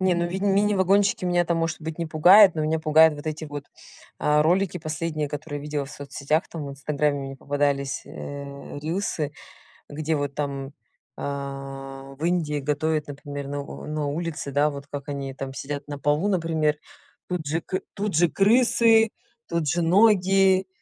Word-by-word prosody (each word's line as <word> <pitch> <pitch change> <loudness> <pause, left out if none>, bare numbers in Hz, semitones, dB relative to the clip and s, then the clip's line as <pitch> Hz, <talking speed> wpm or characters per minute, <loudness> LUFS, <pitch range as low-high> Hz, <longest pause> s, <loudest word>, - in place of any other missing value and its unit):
Не, 185 -1 +3
ну 170 0 0
винь 190 +3 -3
мини 205 +1 +3
вагончики 195 +1 +3
меня 175 -1 +2
там 170 0 0
может 165 -1 -2
быть 160 0 -6
не 170 - -2
пугает, 180 +5 +7
но 155 - -1
меня 155 +1 +1
пугают 160 0 +6
вот 145 +1 -10
эти 155 0 -3
вот, 145 -1 -7 0.5
а, 150 0 +3
ролики 180 +4 +1
последние, 155 -1 -3
которые 145 0 -5
видела 145 0 -3
в - - -11
соцсетях, 145 +3 -2
там, 155 -4 -6
в - - -5
"Инстаграме" 145 +1 -1
мне 135 0 -6
попадались, 140 0 -1
э, 140 0 -8
рилсы, 160 -2 -2 0.6
где 155 +2 -2
вот 145 -1 -2
там, 140 -1 -4 0.4
а, 135 -1 -6
в 155 - -4
Индии 160 -4 0
готовят, 150 +2 0
например, 145 0 -6
на 145 0 -3 0.2
на 150 -1 -2
улице, 155 -1 -4
да. 145 +2 +3
Вот 140 -1 -8
как 140 0 -7
они 140 -1 -4
там 135 0 -6
сидят 140 +1 -5
на 145 -1 -5
полу, 150 +7 +1
например, 160 -5 +1 0.5
тут 180 -4 -3
же 160 +3 0
к 185 +3 -3
тут 205 -1 -2
же 175 +1 +5
крысы, 225 +2 +4 0.4
тут 170 -2 -1
же 175 +4 +1
ноги, 190 0 +4
155 Hz, 175 wpm, -25 LUFS, 145-175 Hz, 0.6 s, пугает